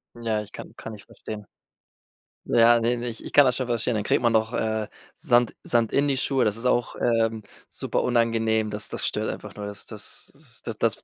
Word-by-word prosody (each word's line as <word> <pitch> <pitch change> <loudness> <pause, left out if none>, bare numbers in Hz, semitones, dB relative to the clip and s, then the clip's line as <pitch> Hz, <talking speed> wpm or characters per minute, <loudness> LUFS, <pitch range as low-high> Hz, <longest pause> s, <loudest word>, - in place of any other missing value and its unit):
Ja, 115 -2 -1
ich 105 - -11
kann - - -9
kann 115 - -7
ich 100 - -14
verstehen. 105 -1 -8 1.0
Ja, 120 0 +5
ne, 120 +2 +1
ne, 120 +1 -4
ich 115 -2 -8
kann 145 - +8
das 125 -2 +2
schon 130 - -1
verstehen, 120 0 0
dann 105 -2 -1
kriegt - - +2
man 120 -1 +3
doch, 110 +1 +1
äh, 110 -1 0 0.3
Sand 120 -1 +3
Sand 115 -2 +1
in 140 +1 +3
die 140 - +2
Schuhe. 130 -1 +1
Das 105 -1 +1
ist 115 +2 -5
auch, 120 -1 +1
ähm, 115 -1 +1 0.3
super - - -2
unangenehm. 115 -2 +2
Das 105 0 -4
das - - -3
stört - - -1
einfach - - -6
nur. 105 -1 -5
Das 100 0 -8
das - - -10 0.3
das - - -5
das - - +2
115 Hz, 210 wpm, -25 LUFS, 110-120 Hz, 1.0 s, kann